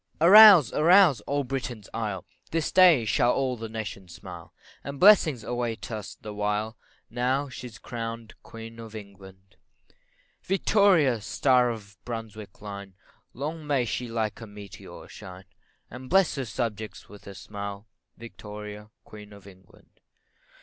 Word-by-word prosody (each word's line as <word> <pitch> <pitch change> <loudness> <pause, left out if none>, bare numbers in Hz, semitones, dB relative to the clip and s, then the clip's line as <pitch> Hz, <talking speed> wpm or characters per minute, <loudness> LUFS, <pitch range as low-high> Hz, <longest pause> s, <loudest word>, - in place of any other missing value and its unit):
Arouse! 190 - +9
arouse! 165 - +5
all 145 0 0
Britain's 125 -5 -5
isle, 105 -5 -4 0.2
This 165 -1 -2
day 175 -10 +6
shall 120 +2 +2
all 130 -2 -1
the 115 -1 -7
nation 105 -4 -7
smile, 85 -1 -11 0.3
And 140 +1 -7
blessings 175 - +5
await 120 -1 -4
on 110 - -3
us 105 - -10
the 105 - -8
while, 105 +2 -2 0.4
Now 130 +4 -1
she's 125 -3 -9
crown'd 115 -1 -7
Queen 115 0 -11
of 115 -1 -10
England 95 -2 -13 0.8
Victoria, 185 - +2
star 125 +2 +2
of 110 -3 -7
the 105 - -25
Brunswick 110 -4 -8
line, 100 -2 -8 0.4
Long 150 +3 -5
may 135 -4 +1
she 125 +2 -4
like 115 -1 -3
a 115 - -8
meteor 105 -1 -12
shine, 95 -2 -12 0.5
And 125 +2 -10
bless 190 -1 +3
her 135 -2 -4
subjects 110 -2 -5
with 105 -1 -15
her 100 - -10
smile, 100 +1 -8 0.3
Victoria, 105 -2 -10
Queen 105 -1 -13
of 100 -2 -15
England. 95 -2 -19
115 Hz, 145 wpm, -26 LUFS, 105-135 Hz, 0.8 s, Arouse